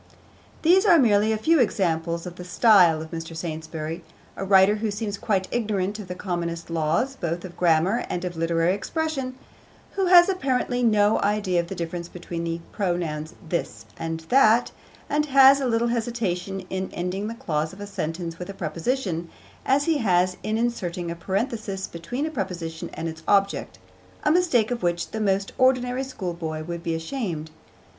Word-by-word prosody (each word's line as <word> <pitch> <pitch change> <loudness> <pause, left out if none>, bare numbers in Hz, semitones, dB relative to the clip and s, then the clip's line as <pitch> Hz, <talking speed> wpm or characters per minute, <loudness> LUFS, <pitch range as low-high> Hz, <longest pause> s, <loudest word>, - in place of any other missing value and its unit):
These 360 +4 +6
are 340 - +7
merely 215 -5 +4
a 220 - +1
few 315 +9 +3
examples 170 -7 0
of 175 -1 -7
the 180 - -8
style 180 -4 +5
of 160 - -11
Mr. 165 -1 -6
Saintsbury, 160 0 -5 0.3
a - - -4
writer 195 +2 +5
who 215 +1 -1
seems 205 0 -3
quite 200 -2 -1
ignorant 210 -3 -1
of 205 - -7
the 180 - -5
commonest 170 -3 -4
laws 165 - 0
both 170 -4 -3
of 175 - -10
grammar 175 +7 +2
and 175 +1 -3
of 175 -1 -4
literary 165 +2 +1
expression, 270 - -3 0.6
who 385 -2 0
has 350 -1 +8
apparently 260 -9 0
no 215 -3 +4
idea 200 -3 +1
of 170 - -2
the 195 - -6
difference 170 0 -4
between 170 -1 -6
the 165 0 -3
pronouns 170 -5 -2
'this' 115 -10 -3
and 165 +3 -4
'that,' 235 +5 +4 0.4
and 300 +1 0
has 275 0 +7
as 260 - 0
little 235 +1 +1
hesitation 210 -6 -2
in 190 0 -2
ending 185 +4 -3
the 230 - -5
clause 160 -10 -2
of 190 - -13
a 205 - -5
sentence 170 -3 -4
with 180 - -6
a 195 - -6
preposition, 175 -5 -2 0.4
as 275 +2 +3
he 320 -1 +1
has 185 -4 +2
in 215 +1 -1
inserting 180 -8 -2
a - - -4
parenthesis 195 +2 -2
between 170 - -4
a 315 - -3
preposition 175 - -4
and 165 - -3
its 160 0 -7
object, 200 -1 +1 0.5
a 300 - +3
mistake 305 -11 +3
of 245 - -2
which 175 -1 -1
the 220 - -3
most 195 -1 +1
ordinary 255 0 +2
schoolboy 170 -10 -5
would 170 +1 -5
be 165 -1 -2
ashamed. 165 - -4
190 Hz, 175 wpm, -24 LUFS, 170-235 Hz, 0.6 s, has